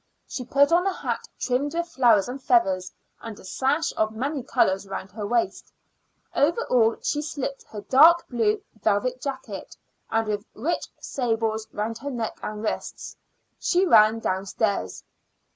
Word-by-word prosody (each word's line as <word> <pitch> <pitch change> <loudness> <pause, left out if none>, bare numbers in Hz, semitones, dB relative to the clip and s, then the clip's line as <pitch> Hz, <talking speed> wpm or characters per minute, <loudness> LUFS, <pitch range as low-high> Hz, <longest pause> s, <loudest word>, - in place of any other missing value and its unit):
She 255 - -5
put 280 +5 +3
on 355 +3 +4
a - - +2
hat - - -4
trimmed 280 +5 -1
with 340 0 -1
flowers 235 - +4
and 260 +2 -6
feathers, 195 -8 +2 0.3
and 225 -2 -8
a - - -14
sash 275 - 0
of 215 0 0
many 275 +5 -2
colors 195 -4 +1
round 195 0 -6
her 210 0 -5
waist. 345 - -1 0.6
Over 335 +11 +2
all 230 -2 +4
she 295 - 0
slipped 280 -2 -4
her 210 - -8
dark 330 +9 +6
blue 220 -4 0 0.2
velvet 250 +5 +1
jacket, 260 -8 -6 0.3
and 225 0 +1
with 205 -1 -2
rich 340 +3 -2
sables 225 -3 -1
round 220 +2 -3
her 285 - -5
neck 235 -4 -4
and 210 0 -5
wrists, 220 - -4 0.4
she 365 +2 +2
ran 220 - +6
downstairs. 195 - -2
235 Hz, 155 wpm, -25 LUFS, 215-280 Hz, 0.6 s, dark